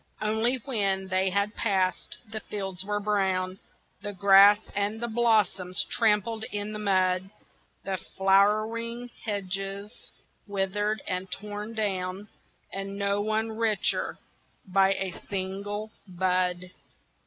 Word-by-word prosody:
Only 220 +4 +2
when 195 -7 0
they 190 0 +2
had 200 +2 0
passed, 190 -4 0
the 215 +1 -5
fields 195 -4 -5
were 205 +1 -1
brown, 190 -2 0 0.4
The 205 0 -5
grass 200 +2 +7 0.2
and 205 +2 0
blossoms 205 -6 +2
trampled 220 0 +2
in 205 +1 -3
the 215 - -4
mud: 185 -2 +2 0.5
The 190 -1 -2 0.2
flowering 215 +5 +2
hedges 200 +1 -4 0.4
withered 205 +2 -1
and 185 0 -2
torn 210 +3 -5
down, 195 -1 -2 0.4
And 195 0 -4
no 200 0 +1
one 220 +1 0
richer 220 -2 0 0.5
by 195 0 +4
a 190 -2 -3 0.2
single 200 +2 -3 0.2
bud. 180 0 0
200 Hz, 110 wpm, -28 LUFS, 190-215 Hz, 0.5 s, grass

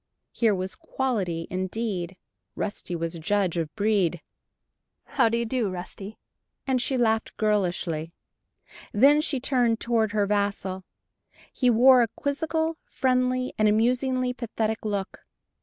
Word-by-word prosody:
Here 225 -4 +2
was 185 +1 -3
"quality" 215 - -2
indeed 185 -1 -3 0.4
Rusty 200 -4 -4
was 165 0 -3
a 170 - -6
judge 190 +1 0
of 165 -3 -2
"breed"! 200 -5 +1 0.8
"How 230 - +2
do 230 - 0
you 235 - -1
do, 230 -3 -1
Rusty?" 190 +3 -8 0.5
and 260 -2 +1
she 260 +1 0
laughed 225 -2 0
girlishly. 175 -6 0 0.8
Then 280 +8 +5
she 290 -3 0
turned 245 -3 +1
toward 225 -3 +1
her 210 -1 +2
vassal. 200 -2 -1 0.7
He 250 - +2
wore 250 +2 +7
a 235 - +3
quizzical, 320 +3 -1
friendly, 255 0 0
and 215 0 +4
amusingly 250 +3 +1
pathetic 220 -3 -3
look. 200 -2 -3
220 Hz, 130 wpm, -26 LUFS, 190-255 Hz, 0.8 s, wore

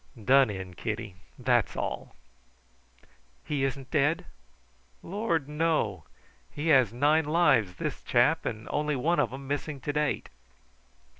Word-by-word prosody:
"Done 135 +1 +5
in, 95 -2 -6
Kitty; 110 +1 -4 0.2
that's - - +1
all." - - -4 1.3
"He 145 -2 -1
isn't 135 -1 -3
dead?" 150 +1 +1 0.8
"Lord, 175 -6 -1
no! 150 - 0 0.4
He 150 +3 -3
had 130 -8 +5
nine 145 +6 +3
lives, 145 - +3
this - - -4
chap, - - +2
and 110 +1 -5
only 150 0 0
one 165 +7 +1
of - - +1
'em 135 +1 -8
missing 145 0 -3
to 145 - -3
date. 150 0 -1
140 Hz, 130 wpm, -28 LUFS, 120-150 Hz, 1.3 s, Done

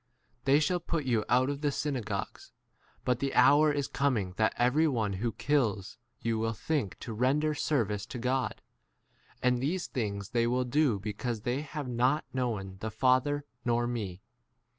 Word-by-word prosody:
e - - -44
They 140 +2 +5
shall 175 +4 +1
put 165 -3 -2
you 115 -4 +2
out 130 +3 +3
of 140 0 -5
the 145 -1 +1
synagogues; 125 -9 -4 0.5
but 125 -1 +1
the 135 -1 -2
hour 150 +1 +6
is 145 -2 -1
coming 115 -10 0
that 110 -1 +2
every 130 +7 +3
one 110 -8 0
who 110 +5 -1
kills 110 -8 0 0.2
you 115 -1 0
will 115 0 0
think 140 -3 -2
to 115 - -5
render 140 +7 +2
service 110 -9 0
to - - -6
3 - - -6
God; 130 +1 -1 0.8
and 125 -1 +3
these 170 +7 -1
things 100 -5 -3
they 120 -1 +1
will 125 +1 +1
do 135 -1 +2
f 100 - -8
because 110 +2 -3
they 125 +5 -1
have 150 -2 -5
not 125 +5 +1
known 115 -7 -1
4 95 - -12
the 110 - -3
Father 130 +5 +2 0.2
nor 120 0 +1
me. 105 -6 -4
125 Hz, 185 wpm, -30 LUFS, 110-140 Hz, 0.8 s, hour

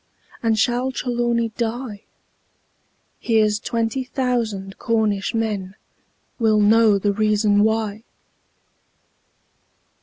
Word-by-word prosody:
Or 225 -1 +2
shall 245 +4 +1
Trelawny 240 -2 -1
die? 230 -2 -4 1.1
Here's 215 -2 +2
twenty 230 +4 -2
thousand 235 -7 -2
Cornish 220 -2 0
men 205 -4 -2 0.6
Will 220 -2 +3
know 215 0 +5
the 200 +1 0
reason 210 0 +2
why! 220 -1 0
220 Hz, 85 wpm, -21 LUFS, 210-235 Hz, 1.1 s, know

